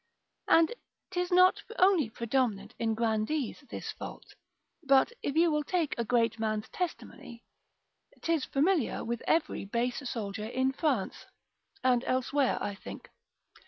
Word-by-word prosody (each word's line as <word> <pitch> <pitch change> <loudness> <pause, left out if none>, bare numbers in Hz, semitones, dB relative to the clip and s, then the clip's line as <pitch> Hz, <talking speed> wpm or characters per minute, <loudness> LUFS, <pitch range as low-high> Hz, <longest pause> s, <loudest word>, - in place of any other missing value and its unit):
And 330 +5 +5 0.4
'tis 360 -1 -1
not 365 +1 +5 0.2
only 365 - +4
predominant 225 -3 -1
in 225 -1 0
grandees 230 +6 -1
this - - -5
fault: - - -9 0.5
but 275 - +4
if 280 - -2
you 335 0 +4
will 300 0 +1
take 335 -1 0
a 235 - -1
great 230 -1 +1
man's 215 -1 -1
testimony, 280 -9 -6 0.8
'tis 330 -4 +1
familiar 300 - +1
with 235 0 -3
every 325 0 +1
base 235 +5 -1
soldier 210 -1 -4
in 260 +3 +1
France, 265 - -1 0.6
(and 250 -1 +3
elsewhere, 260 +1 +1
I 205 - -3
think). 195 - -10
255 Hz, 130 wpm, -30 LUFS, 225-315 Hz, 0.8 s, And